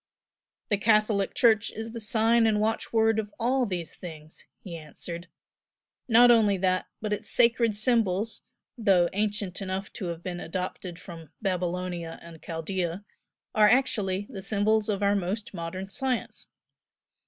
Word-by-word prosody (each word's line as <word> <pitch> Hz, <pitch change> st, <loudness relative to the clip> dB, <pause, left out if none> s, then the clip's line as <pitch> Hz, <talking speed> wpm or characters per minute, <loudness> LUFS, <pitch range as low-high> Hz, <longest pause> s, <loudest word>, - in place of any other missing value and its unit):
"The 205 Hz, -, +1 dB
Catholic 215 Hz, -2 st, +2 dB
Church 225 Hz, -2 st, +4 dB
is 225 Hz, +1 st, -6 dB
the 230 Hz, -, -6 dB
sign 225 Hz, +1 st, +3 dB
and 210 Hz, -1 st, +2 dB
watchword 225 Hz, 0 st, +1 dB
of 210 Hz, -1 st, -4 dB
all 250 Hz, +1 st, +1 dB
these 175 Hz, -4 st, -4 dB
things!" 155 Hz, -3 st, -10 dB, 0.2 s
he 180 Hz, -5 st, -7 dB
answered 170 Hz, +2 st, -8 dB, 0.8 s
"Not 240 Hz, +1 st, +7 dB
only 210 Hz, -4 st, +4 dB
that, 185 Hz, 0 st, +1 dB
but 210 Hz, -1 st, -1 dB
its 210 Hz, +1 st, -4 dB
sacred 235 Hz, -3 st, +3 dB
symbols, 220 Hz, -2 st, +1 dB, 0.3 s
though 190 Hz, -7 st, +3 dB
ancient 205 Hz, -2 st, -1 dB
enough 190 Hz, 0 st, -4 dB
to 190 Hz, -, -5 dB
have 170 Hz, 0 st, -5 dB
been 180 Hz, -1 st, -4 dB
adopted 180 Hz, 0 st, -5 dB
from 165 Hz, -5 st, -11 dB
Babylonia 180 Hz, -3 st, -2 dB
and 165 Hz, -1 st, -12 dB
Chaldea, 175 Hz, +3 st, -3 dB, 0.5 s
are 210 Hz, -1 st, +6 dB
actually 205 Hz, -7 st, +1 dB
the 195 Hz, -6 st, -6 dB
symbols 210 Hz, +2 st, +1 dB
of 205 Hz, -1 st, -1 dB
our 200 Hz, 0 st, +3 dB
most 200 Hz, +3 st, -3 dB
modern 185 Hz, +2 st, -5 dB
science. 255 Hz, +4 st, -3 dB
200 Hz, 140 wpm, -27 LUFS, 180-220 Hz, 0.8 s, Not